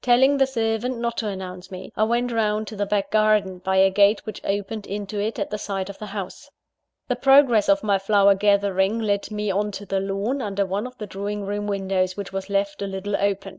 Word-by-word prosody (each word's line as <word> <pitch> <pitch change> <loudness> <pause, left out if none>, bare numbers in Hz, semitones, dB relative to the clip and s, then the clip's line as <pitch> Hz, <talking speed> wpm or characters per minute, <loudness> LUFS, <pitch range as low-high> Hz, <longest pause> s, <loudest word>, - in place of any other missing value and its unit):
Telling 265 +3 +4
the 270 - +4
servant 230 0 -1
not 235 0 -2
to 220 - -1
announce 185 -2 -6
me, 185 -1 -9
I 215 - +2
went 240 +2 0
round 215 -1 0
to 215 - -8
the 205 0 -2
back 205 -1 -1
garden, 215 -4 +2
by 190 +1 -1
a 190 0 +5
gate 200 +2 +3
which 215 - -7
opened 205 +1 -3
into 205 +1 -4
it 215 +2 -2
at - - -3
the 210 - -3
side 195 -1 -3
of 195 - -16
the 215 - -6
house. 200 -2 -7 0.6
The 250 - 0
progress 270 -4 +5
of 200 +1 +3
my 200 -2 +2
flower 200 0 +4
gathering 200 0 +2
led 205 -3 -1
me 210 -1 -2
on 205 +2 0
to 205 +1 -7
the 195 0 -1
lawn 200 +8 -2
under 200 -3 -1
one 200 +5 -2
of 250 0 -14
the 210 - -5
drawing 200 +1 -4
room 205 +1 -3
windows, 190 -2 -1
which 200 -1 -6
was 195 0 -4
left 200 0 -1
a 200 - -2
little 195 +1 -3
open. 200 0 -1
205 Hz, 230 wpm, -23 LUFS, 195-215 Hz, 0.6 s, a